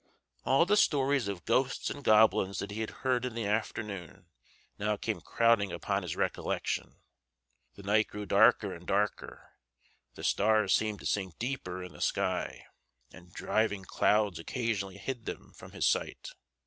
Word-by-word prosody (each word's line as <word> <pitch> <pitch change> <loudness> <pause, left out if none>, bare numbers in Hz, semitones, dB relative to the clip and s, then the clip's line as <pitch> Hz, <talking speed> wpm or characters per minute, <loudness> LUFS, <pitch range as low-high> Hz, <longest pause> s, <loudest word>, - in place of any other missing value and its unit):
All 135 +7 +4
the 205 +3 +3
stories 140 - +3
of 100 -3 -5
ghosts 130 +3 +1
and 145 - -7
goblins 105 -4 +4
that 100 +3 -4
he 110 +2 -4
had 110 - -2 0.2
heard 125 -2 +2
in 125 -2 -4
the 115 -2 -2
afternoon 105 -4 -3 0.5
now 105 0 0
came - - -3
crowding 115 -5 +2
upon - - -1
his - - -4
recollection. - - -2 0.7
The 100 - -12
night 105 +2 +3
grew 105 0 -6
darker 100 0 +4
and 85 +1 -11
darker; 105 +1 -2 0.6
the - - -9
stars 110 +1 +3
seemed 110 -2 0
to - - -11
sink 95 -5 -2
deeper 115 -8 -4
in 90 -3 -9
the 75 - -12
sky, - - -1 0.5
and 85 0 -15
driving 100 0 -1
clouds 105 -2 +2
occasionally 100 -1 -3
had 120 +2 -5
them - - -7
from - - -12
his - - -1
sight. - - 0
105 Hz, 160 wpm, -30 LUFS, 100-115 Hz, 0.7 s, All